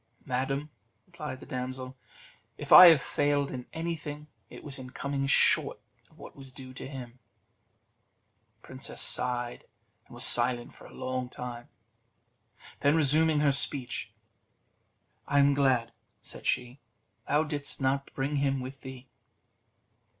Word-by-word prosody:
"Madam," 135 Hz, +3 st, -3 dB, 0.3 s
replied 150 Hz, -7 st, -8 dB
the -, -, -12 dB
damsel, 130 Hz, 0 st, -6 dB, 0.6 s
"if -, -, -8 dB
I 180 Hz, -, +12 dB
have 160 Hz, -5 st, +6 dB
failed 145 Hz, -1 st, 0 dB
in 125 Hz, -1 st, -7 dB
anything, 155 Hz, -3 st, -5 dB, 0.2 s
it -, -, -12 dB
was 140 Hz, -2 st, -4 dB
in 130 Hz, -1 st, -9 dB
coming 140 Hz, +1 st, -3 dB
short 140 Hz, -, +3 dB, 0.3 s
of -, -, -25 dB
what -, -, -12 dB
was 135 Hz, -1 st, -12 dB
due 130 Hz, 0 st, -11 dB
to 130 Hz, -, -8 dB
him." 130 Hz, -3 st, -9 dB, 1.4 s
The 115 Hz, -, -22 dB
princess 130 Hz, +1 st, -6 dB
sighed, 120 Hz, -1 st, -1 dB, 0.4 s
and -, -, -14 dB
was -, -, +2 dB
silent 120 Hz, 0 st, +4 dB
for -, -, -15 dB
a 130 Hz, -1 st, -5 dB
time; 120 Hz, -1 st, -8 dB, 1.1 s
then 145 Hz, +2 st, +3 dB
resuming 155 Hz, 0 st, +3 dB
her 145 Hz, -2 st, +3 dB
speech: 135 Hz, -2 st, -1 dB, 1.2 s
"I 145 Hz, -, 0 dB
am 140 Hz, 0 st, +5 dB
glad," 130 Hz, -4 st, +1 dB, 0.3 s
said -, -, -8 dB
she, 125 Hz, +2 st, -2 dB, 0.5 s
"thou 150 Hz, +2 st, +2 dB
didst 145 Hz, -2 st, -5 dB
not 135 Hz, +1 st, -1 dB
bring 140 Hz, +2 st, -2 dB
him 135 Hz, -1 st, 0 dB
with 130 Hz, +1 st, -8 dB
thee." 130 Hz, -1 st, -10 dB
135 Hz, 135 wpm, -28 LUFS, 130-145 Hz, 1.4 s, I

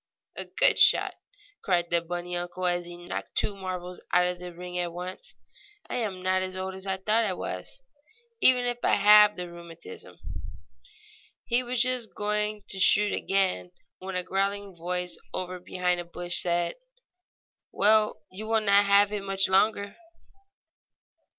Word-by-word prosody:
A -, -, -5 dB
good -, -, +5 dB
shot!" -, -, +5 dB, 0.5 s
cried 175 Hz, -3 st, 0 dB
the 170 Hz, 0 st, +3 dB
bunny 175 Hz, +1 st, -5 dB
uncle, 175 Hz, +1 st, -4 dB
as 175 Hz, -1 st, 0 dB
he 175 Hz, 0 st, -9 dB
knocked -, -, -6 dB
two 205 Hz, -, -1 dB
marbles 180 Hz, -2 st, -6 dB
out 180 Hz, 0 st, +4 dB
of 180 Hz, 0 st, -2 dB
the 180 Hz, 0 st, -7 dB
ring 180 Hz, +1 st, -6 dB
at 175 Hz, -1 st, -2 dB
once. 185 Hz, -, -8 dB, 0.6 s
"I -, -, -1 dB
am 200 Hz, -6 st, -3 dB
not 185 Hz, 0 st, +2 dB
so 185 Hz, 0 st, -4 dB
old 190 Hz, 0 st, -5 dB
as 190 Hz, +1 st, -9 dB
I 190 Hz, 0 st, -1 dB
thought 215 Hz, +4 st, +1 dB
I 200 Hz, -4 st, 0 dB
was, -, -, -6 dB, 0.6 s
even 250 Hz, -1 st, +5 dB
if 245 Hz, 0 st, -3 dB
I -, -, +4 dB
have 210 Hz, +1 st, +7 dB
the 180 Hz, 0 st, -5 dB
rheumatism." 170 Hz, -, -11 dB, 1.3 s
He 240 Hz, +1 st, +2 dB
was 250 Hz, 0 st, +1 dB
just 250 Hz, -3 st, -1 dB
going 210 Hz, 0 st, -1 dB
to 195 Hz, -, -1 dB
shoot 205 Hz, +2 st, +4 dB
again 190 Hz, -2 st, 0 dB, 0.3 s
when 190 Hz, 0 st, -6 dB
a 180 Hz, -, -1 dB
growling 195 Hz, +1 st, -2 dB
voice 180 Hz, +1 st, -3 dB, 0.2 s
over 185 Hz, 0 st, -4 dB
behind 180 Hz, 0 st, -1 dB
a -, -, -4 dB
bush 175 Hz, +1 st, -2 dB
said: 175 Hz, -1 st, 0 dB, 0.9 s
"Well, 215 Hz, -4 st, +3 dB
you 210 Hz, +4 st, -7 dB
will 225 Hz, 0 st, +2 dB
not 200 Hz, -1 st, +4 dB
have 200 Hz, 0 st, +5 dB
it 210 Hz, -1 st, -3 dB
much 195 Hz, 0 st, +1 dB
longer." 200 Hz, +1 st, +1 dB
190 Hz, 165 wpm, -27 LUFS, 180-210 Hz, 1.3 s, have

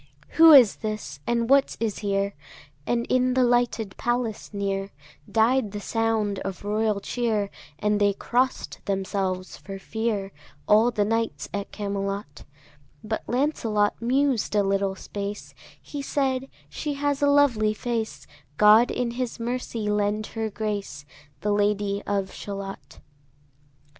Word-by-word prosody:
Who 325 Hz, 0 st, +7 dB
is 255 Hz, -8 st, +8 dB
this? 215 Hz, -10 st, -5 dB
and 235 Hz, -1 st, +1 dB
what 275 Hz, +2 st, +3 dB
is 220 Hz, -3 st, -2 dB
here? 200 Hz, -1 st, 0 dB, 0.5 s
And 235 Hz, 0 st, +1 dB
in 255 Hz, 0 st, +2 dB
the 260 Hz, -, +4 dB
lighted 240 Hz, -4 st, +1 dB
palace 240 Hz, -3 st, -2 dB
near 195 Hz, -1 st, -2 dB, 0.4 s
Died 225 Hz, -1 st, +2 dB
the 205 Hz, -, -3 dB
sound 220 Hz, -2 st, 0 dB
of 195 Hz, -, -5 dB
royal 210 Hz, 0 st, +1 dB
cheer; 215 Hz, -1 st, -1 dB, 0.3 s
And 210 Hz, +3 st, +1 dB
they 205 Hz, -1 st, +4 dB
cross'd 250 Hz, +6 st, -1 dB
themselves 190 Hz, -1 st, -2 dB
for 195 Hz, 0 st, -8 dB
fear, 210 Hz, -1 st, -2 dB, 0.4 s
All 215 Hz, +3 st, +5 dB
the 210 Hz, -4 st, 0 dB
knights 225 Hz, +1 st, -1 dB
at 200 Hz, 0 st, -4 dB
Camelot: 200 Hz, -5 st, -4 dB, 0.6 s
But 220 Hz, +1 st, -2 dB
Lancelot 230 Hz, -6 st, +1 dB
mused 255 Hz, -2 st, +1 dB
a 205 Hz, -, +4 dB
little 195 Hz, 0 st, 0 dB
space; 205 Hz, +1 st, -6 dB, 0.3 s
He 290 Hz, -, -7 dB
said, 270 Hz, -1 st, -1 dB, 0.2 s
"She 295 Hz, -2 st, -4 dB
has 285 Hz, 0 st, -1 dB
a 285 Hz, -, +4 dB
lovely 240 Hz, -7 st, +3 dB
face; 230 Hz, -1 st, -3 dB, 0.3 s
God 215 Hz, +3 st, +7 dB
in 245 Hz, -1 st, -1 dB
his 245 Hz, 0 st, -4 dB
mercy 235 Hz, -2 st, -3 dB
lend 210 Hz, +1 st, 0 dB
her 225 Hz, -1 st, -2 dB
grace, 205 Hz, -9 st, -4 dB, 0.4 s
The 210 Hz, -, 0 dB
Lady 205 Hz, -1 st, +1 dB
of 195 Hz, -2 st, -1 dB
Shalott." 195 Hz, -8 st, -7 dB
215 Hz, 135 wpm, -25 LUFS, 200-240 Hz, 0.6 s, is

